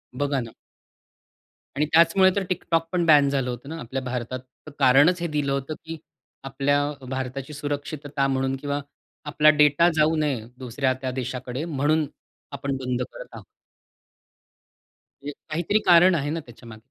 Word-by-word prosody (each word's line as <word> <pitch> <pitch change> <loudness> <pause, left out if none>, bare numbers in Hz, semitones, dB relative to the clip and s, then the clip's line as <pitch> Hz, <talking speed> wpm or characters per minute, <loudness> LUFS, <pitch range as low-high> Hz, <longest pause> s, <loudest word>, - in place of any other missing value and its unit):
बघा 140 0 0
ना. 115 -2 -6 1.2
आणि 150 +2 +1
त्याचमुळे 170 +3 +6
तर 200 - 0
TikTok 165 -2 0
पण 180 -2 +1
बॅन 145 -3 +6
झालं 135 -3 -1
होतं 125 +3 -7
ना, 165 +1 -6
आपल्या 130 +1 -5
भारतात 125 0 -4 0.4
कारणच 145 +8 +5
हे 170 - -1
दिलं 150 -3 -1
होतं, 140 +3 -2
की 165 0 -6 0.5
आपल्या 140 +1 0 0.3
भारताची 130 +2 -5
सुरक्षितता 145 -1 -3
म्हणून 135 0 0
किंवा 145 +1 -3 0.4
आपला 150 +1 +4
डेटा 150 +2 +4
जाऊ 155 +1 +3
नये 140 -8 -1
दुसऱ्या 130 +1 -1
त्या 130 - -2
देशाकडे 130 +2 -4
म्हणून 155 0 +1 0.5
आपण 140 0 -3
बंद 125 -1 -3
करत - - -9
आहोत. - - -10 1.8
म्हणजे 145 - -4 0.2
काहीतरी 175 +7 0
कारण 175 +1 +7
आहे 145 -1 -1
ना 165 - -2
त्याच्यामागे. 115 -5 -13
145 Hz, 145 wpm, -24 LUFS, 130-155 Hz, 1.8 s, कारण